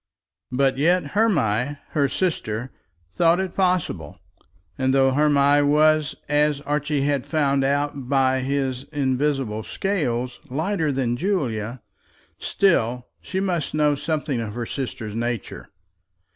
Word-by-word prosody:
But 135 +1 +1
yet 165 -1 +2
Hermy, 145 - +1
her 140 -2 +1
sister, 130 - -2 0.4
thought 170 - +3
it 190 -2 -2
possible; 180 - 0 0.6
and 130 0 +1
though 135 -1 +4
Hermy 145 0 +4
was, 150 +1 +3
as 150 0 +2
Archie 145 -1 -1
had 140 -2 0
found 140 -4 +1
out 140 -1 -1
by 130 -1 +3
his 135 -1 -2
invisible 135 -5 -1
scales, 125 - -2
lighter 160 +3 0
than 125 -3 -1
Julia, 125 - -2 0.6
still 125 - +1
she 190 - -3
must 175 -6 -1
know 150 -1 +3
something 145 -3 -2
of 105 -1 -5
her 120 -1 -3
sister's 115 -5 -5
nature. 120 -1 -4
140 Hz, 120 wpm, -23 LUFS, 125-155 Hz, 0.6 s, though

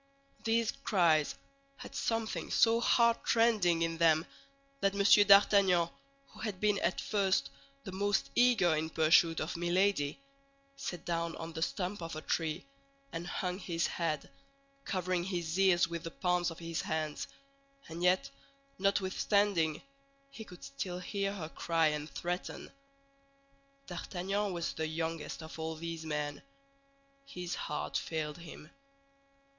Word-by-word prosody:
These 225 0 +2
cries 165 -6 +3 0.4
had - - -10
something 225 -1 -2
so 230 0 +4
heartrending 230 -7 +3
in 165 0 -2
them 160 -1 +4 0.5
that 195 -3 +1
M. 205 +1 +6
d'Artagnan, 200 -4 +6 0.4
who - - -16
had 210 -5 -4
been 210 -1 +2
at 175 - 0
first 195 -2 +1 0.3
the - - -7
most 200 +2 0
eager 225 -9 +4
in 155 +1 -1
pursuit 165 +1 +4
of 155 - -3
Milady, 175 - +1 0.6
sat 185 -11 -6
down 170 -1 -1
on 165 0 -7
the 160 - -5
stump 185 +3 -2
of 165 -1 -5
a 155 - -5
tree 160 +1 -1 0.5
and 165 +1 -4
hung 180 +1 -3
his 170 -3 -1
head, 160 -4 -2 0.6
covering 185 -2 -1
his 175 -2 -2
ears 185 -3 +5
with 170 -1 -5
the 165 - -4
palms 180 0 0
of 165 - -9
his 165 -1 -3
hands; 155 -1 -3 0.6
and 165 +1 -7
yet, 180 +1 +3 0.5
notwithstanding, 195 -4 +1 0.5
he 225 - -8
could 180 -4 -13
still 190 -10 -5
hear 195 +2 -2
her 165 -6 -6
cry 165 -1 +1
and 150 0 -4
threaten. 175 +1 -4 1.1
D'Artagnan 195 +3 -3
was 170 -2 -3
the 160 0 -2
youngest 160 0 -4
of 160 +1 -9
all 160 0 -3
these 165 0 -5
men. 150 -1 -3 0.9
His 180 -7 -5
heart - - -3
failed 155 0 -4
him. 160 -2 -11
175 Hz, 135 wpm, -32 LUFS, 165-195 Hz, 1.1 s, M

